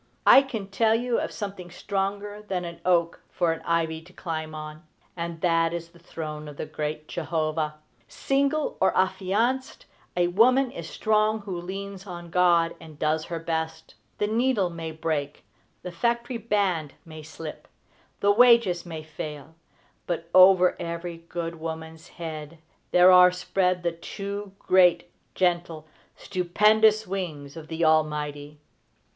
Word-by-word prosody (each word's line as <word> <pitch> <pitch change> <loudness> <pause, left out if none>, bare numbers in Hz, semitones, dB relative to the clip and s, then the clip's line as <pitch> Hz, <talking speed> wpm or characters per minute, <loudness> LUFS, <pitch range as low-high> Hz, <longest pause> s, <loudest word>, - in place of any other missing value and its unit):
I 270 - +9
can 245 -7 -5
tell 220 +3 +2
you 240 +1 0
of - - -3
something 195 -4 -6
stronger 200 +3 -3
than 190 -4 -3
an 170 -1 -8
oak 170 -2 +1
for 175 -2 0
an 165 - -4
ivy 165 -1 -1
to 175 +3 -18
climb 160 -3 -5
on, 155 +1 -8 0.3
and 170 -1 -5
that 165 -2 +2
is 170 -1 -6
the 170 0 -20
throne 155 -2 -7
of 145 -1 -10
the - - -4
great 155 0 -5
Jehovah. 155 -2 -2 0.3
Single 280 +2 0
or 190 - +3
affianced, 205 +8 0 0.3
that 175 0 +1
woman 250 +5 +4
is 165 -1 -7
strong 215 0 +1
who 200 -3 -5
leans 195 +2 -7
on 175 -2 -8
God 170 -2 +3
and 155 -2 -12
does 155 +1 0
her 170 - -4
best. 160 0 -4 0.2
The 210 - 0
needle 220 -4 +1
may 165 -1 -6
break; 155 -2 -3 0.4
the 180 - -6
factory 235 +6 -1
band 195 -9 -1
may 155 -1 -10
slip; 155 0 -9 0.5
the 200 - +4
wages 230 -6 +5
may 160 -2 -6
fail; 150 -1 -8 0.5
but, 170 -1 -4
over 185 -1 +7
every 170 0 -5
good 165 -1 -4
woman's 160 0 -7
head 160 -1 -7 0.3
there 180 +1 +7
are 180 0 +8
spread 180 0 0
the 170 - +1
two 200 +4 -6
great, 180 -3 +3 0.2
gentle, 170 -3 0 0.3
stupendous 215 +4 +3
wings 160 -7 -5
of 160 -1 -9
the 165 +1 -1
Almighty. 150 -2 0
175 Hz, 145 wpm, -26 LUFS, 160-200 Hz, 0.5 s, I